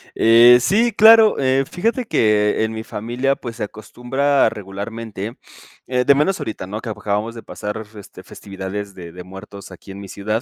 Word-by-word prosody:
Eh, 120 Hz, +2 st, +7 dB
sí 230 Hz, -, +2 dB
claro, 220 Hz, 0 st, +6 dB
eh, 135 Hz, 0 st, +1 dB
fíjate 230 Hz, +7 st, -2 dB
que 105 Hz, -, +1 dB
en 110 Hz, -, -2 dB
mi 110 Hz, 0 st, -6 dB
familia, 120 Hz, +6 st, -2 dB
pues, 115 Hz, -2 st, -9 dB
se -, -, -4 dB
acostumbra 125 Hz, +5 st, -1 dB
regularmente, 105 Hz, +2 st, -7 dB, 0.5 s
eh, 125 Hz, -1 st, 0 dB
de 140 Hz, -, +5 dB
menos 165 Hz, +7 st, 0 dB
ahorita, 105 Hz, -4 st, -6 dB
¿no?, 105 Hz, +3 st, -6 dB
que 115 Hz, -, -7 dB
acabamos 105 Hz, +2 st, -3 dB
de 115 Hz, -, -10 dB
pasar, 105 Hz, +1 st, -6 dB
este, 100 Hz, -2 st, -13 dB
festividades 100 Hz, 0 st, -7 dB
de 85 Hz, -2 st, -10 dB
de 90 Hz, +1 st, -10 dB
muertos 95 Hz, +2 st, -12 dB
aquí 95 Hz, -, -13 dB
en 95 Hz, -, -9 dB
mi 100 Hz, -, -9 dB
ciudad, 105 Hz, +4 st, -3 dB
110 Hz, 180 wpm, -19 LUFS, 100-130 Hz, 0.5 s, Eh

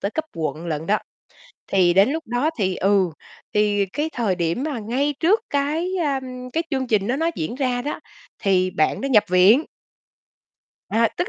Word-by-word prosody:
tới 200 Hz, -, -2 dB
cấp 315 Hz, -, -2 dB
quận 160 Hz, +1 st, -3 dB
lận 160 Hz, 0 st, -3 dB
đó. 210 Hz, +1 st, +2 dB, 0.7 s
Thì 180 Hz, -3 st, +4 dB
đến 195 Hz, +7 st, +5 dB
lúc 320 Hz, +2 st, -3 dB
đó 245 Hz, +7 st, 0 dB
thì, 190 Hz, -2 st, 0 dB
ừ, 195 Hz, -2 st, +2 dB, 0.4 s
thì 205 Hz, -1 st, +2 dB
cái 295 Hz, +11 st, -3 dB
thời 225 Hz, -6 st, 0 dB
điểm 170 Hz, +8 st, -1 dB
mà 290 Hz, -6 st, -3 dB
ngay 265 Hz, +7 st, -1 dB
trước 380 Hz, +7 st, +4 dB
cái, 300 Hz, +6 st, 0 dB
a, 275 Hz, -2 st, 0 dB, 0.3 s
cái 330 Hz, -, 0 dB
chương 265 Hz, -2 st, -1 dB
trình 210 Hz, -3 st, +1 dB
đó 250 Hz, -, 0 dB
nó 325 Hz, +3 st, +1 dB
diễn 160 Hz, +10 st, -3 dB
ra 255 Hz, -2 st, -1 dB
đó, 295 Hz, -, -4 dB, 0.4 s
thì 185 Hz, -2 st, +2 dB
bạn 155 Hz, -3 st, 0 dB
đó 275 Hz, -, -2 dB
nhập 235 Hz, -6 st, +4 dB
viện. 195 Hz, -, +5 dB, 1.2 s
À, 230 Hz, +2 st, +3 dB
tức 355 Hz, -, -1 dB
230 Hz, 185 wpm, -22 LUFS, 190-285 Hz, 1.2 s, đến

